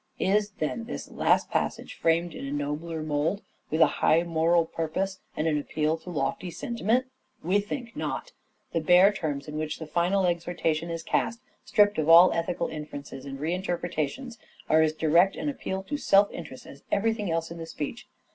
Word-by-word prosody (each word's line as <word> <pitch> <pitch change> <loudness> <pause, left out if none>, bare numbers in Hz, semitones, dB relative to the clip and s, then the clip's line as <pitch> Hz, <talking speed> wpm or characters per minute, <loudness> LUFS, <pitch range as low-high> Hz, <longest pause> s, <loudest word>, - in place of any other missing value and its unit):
Is, 205 +2 +2
then, 190 +9 -2
this 245 - -7
last - - +2
passage - - -2
framed 165 +1 +1
in 140 - -6
a - - -5
nobler 150 +3 -3
mould 155 +6 -1 0.3
with 160 +2 0
a - - +10 0.2
high 165 +2 +4
moral 165 0 +2
purpose 165 +5 -3 0.2
and 155 - 0
an 150 -2 +2
appeal 155 +2 0
to 180 - -11
lofty 150 +3 -2
sentiment? 235 +6 0 0.4
We 185 +5 +2
think 230 +3 -5
not. - - -4 0.4
The 165 - +2
bare 180 +5 +6
terms 150 -7 -3
in 150 0 -5
which 155 0 -3
the 160 - -7
final 175 +5 +1
exhortation 170 -2 -1
is 165 -1 -4
cast, 230 +1 0 0.3
stripped 205 -3 +3
of 155 +1 0
all 170 +2 +9
ethical 170 +1 -1
inferences 145 -3 -8
and 135 -1 -6
reinterpretations, 175 - -3 0.3
are 160 +1 +5
as 155 -1 +2
direct 165 +5 +3
an 295 - -2
appeal 190 -8 -4
to 290 +9 -3
self 200 -7 +4
interest 130 -6 -9
as 140 - -12
everything 215 -1 0
else 165 0 -1
in 170 - -7
the 165 - -6
speech. 165 +8 -6
170 Hz, 180 wpm, -27 LUFS, 155-195 Hz, 0.4 s, a